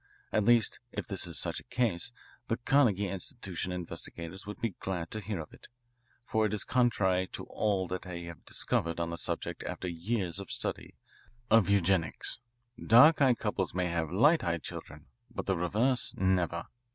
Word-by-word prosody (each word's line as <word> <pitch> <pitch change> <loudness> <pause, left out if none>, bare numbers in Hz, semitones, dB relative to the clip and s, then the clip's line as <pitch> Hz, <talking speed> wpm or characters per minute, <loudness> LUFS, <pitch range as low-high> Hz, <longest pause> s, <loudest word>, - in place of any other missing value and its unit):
At 105 - +2
least, 120 -1 +4
if - - -4
this - - -2
is - - -5
such - - -2
a - - -14
case, 120 -4 0 0.4
the 115 - 0
Carnegie 120 -7 +3
Institution 95 - -4
investigators 90 +1 -6
would 105 - -6
be 115 -4 -1
glad 90 -3 -3
to 110 - -3
hear 105 -3 -4
of 75 - -8
it, - - -14 0.6
for 110 -2 +2
it 105 - -2
is 105 - +1
contrary 95 -7 +2
to - - -5
all 100 -4 0
that 90 - -3
they 85 -2 -6
have 85 -1 -9
discovered 85 0 -1
on 85 0 -1
the - - -2
subject - - -3
after - - -4
years 90 +1 -2
of 100 - -7
study - - -3 0.6
of 110 -3 +6
eugenics. 95 0 +1 0.4
Dark 145 +8 +7
eyed 130 -4 +5
couples 100 -4 -2
may 90 -1 +1
have 80 -2 -1
light 145 - +5
eyed 85 -3 -1
children, 75 +1 -7 0.2
but 120 - -5
the 95 - +1
reverse, 110 +9 +1
never. 90 -2 +1
95 Hz, 175 wpm, -31 LUFS, 85-115 Hz, 0.6 s, Dark